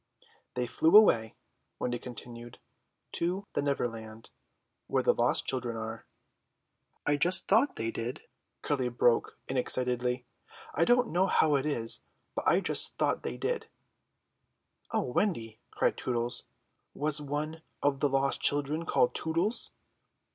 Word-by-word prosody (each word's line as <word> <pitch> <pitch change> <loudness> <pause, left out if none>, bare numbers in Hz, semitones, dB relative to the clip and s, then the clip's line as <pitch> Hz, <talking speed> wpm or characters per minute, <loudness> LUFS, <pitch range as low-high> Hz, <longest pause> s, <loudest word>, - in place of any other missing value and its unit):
"They 125 - 0
flew 160 - +5
away," 115 - +5 0.4
Wendy 120 -1 -2
continued, 120 -1 -9 0.5
"to 180 +4 -1
the - - 0
Neverland, 115 -5 -3 0.6
where - - +1
the - - +4
lost - - +2
children 120 -3 -2
are." 110 0 -6 1.0
"I 145 0 +2
just 175 +5 +2
thought 230 +8 +3
they 115 0 -2
did," 115 +3 -5 0.4
Curly 130 -4 0
broke 120 0 +2
in 130 - -2
excitedly. 125 0 0 0.5
"I 165 - +3
don't 245 +2 +3
know 185 +2 +3
how 155 -4 +3
it 140 +1 +1
is, 115 -6 +2 0.3
but - - -3
I - - +5
just - - -1
thought - - +1
they 60 - -4
did!" - - -2 1.2
"O - - 0
Wendy," 115 - -1
cried - - 0
Tootles, 120 -1 -2 0.5
"was 150 0 -1
one 150 +3 -3 0.2
of 140 -1 +2
the 145 - +2
lost 135 0 +1
children 145 +3 +2
called 125 - +3
Tootles?" 170 +8 0
135 Hz, 135 wpm, -30 LUFS, 120-160 Hz, 1.2 s, flew